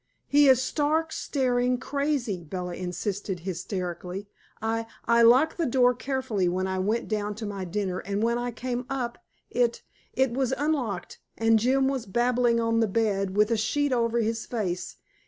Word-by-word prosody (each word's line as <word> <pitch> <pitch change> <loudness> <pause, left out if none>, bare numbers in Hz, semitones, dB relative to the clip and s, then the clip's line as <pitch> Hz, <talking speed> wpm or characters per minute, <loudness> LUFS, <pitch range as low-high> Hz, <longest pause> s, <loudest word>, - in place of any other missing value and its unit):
"He 290 0 +5
is 260 -2 +6
stark, 310 +4 0
staring 250 -4 0
crazy," 275 - -1
Bella 180 +2 -5
insisted 185 +1 -4
hysterically. 180 +1 -4 0.3
"I 225 +1 -1 0.2
I 235 0 +4
locked 255 +7 +5
the 330 - +1
door 250 0 +4
carefully 250 -8 -1
when 185 +1 -1
I 190 0 -2
went 215 +5 0
down 210 -1 -2
to 220 +1 -6
my 200 -2 -4
dinner, 185 0 -2
and 200 +2 -2
when 235 +1 +1
I 245 0 -2
came 245 +1 -4
up 250 -3 -3 0.3
it 240 -1 +1 0.3
it 265 -1 +2
was 260 +1 0
unlocked, 260 - -2 0.2
and 225 0 +4
Jim 265 +4 +3
was 265 -5 -2
babbling 240 +2 +2
on 230 0 +1
the 225 - +3
bed, 195 -2 0
with 210 +2 +4
a 230 - +3
sheet 285 +6 +1
over 235 -1 +1
his 225 +1 -2
face. 185 -7 -3
230 Hz, 170 wpm, -27 LUFS, 200-255 Hz, 0.3 s, is